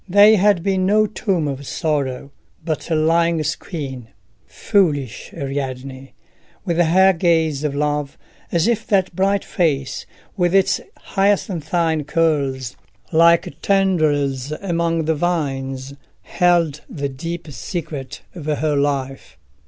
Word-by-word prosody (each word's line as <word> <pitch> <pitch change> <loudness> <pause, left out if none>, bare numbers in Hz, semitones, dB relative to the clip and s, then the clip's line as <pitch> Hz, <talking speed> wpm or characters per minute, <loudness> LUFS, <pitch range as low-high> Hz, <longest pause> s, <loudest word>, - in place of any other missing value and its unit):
They 205 +3 +7
had 200 -3 +3
been 190 -1 +1
no 215 +2 +4
tomb 190 -6 -1
of 140 -1 -5
sorrow, 140 -3 -2 0.3
but 160 0 -3
a 165 - +1
lying 165 +1 +2
screen. 140 - -5 0.4
Foolish 150 - 0
Ariadne! 135 -2 -5 0.5
with 170 -3 -1
her 185 +3 +5
gaze 160 -4 +1
of 145 -2 -1
love, 145 -1 -1 0.3
as 170 +3 +2
if 230 -2 0
that 190 -4 +1
bright 195 +1 +1
face, 140 -6 -1 0.3
with 175 -2 +1
its 195 -1 +3 0.3
hyacinthine 170 -5 +1
curls 140 -6 0 0.4
like 165 -2 +3
tendrils 150 -9 +1
among 165 -2 -1
the 160 - +2
vines, 135 -5 -2 0.3
held 170 -4 +1
the 140 -2 -3
deep 165 +5 -6
secret 145 +1 -6
of 160 -4 -8
her 150 0 0
life! 140 -2 -2
160 Hz, 120 wpm, -20 LUFS, 140-175 Hz, 0.5 s, They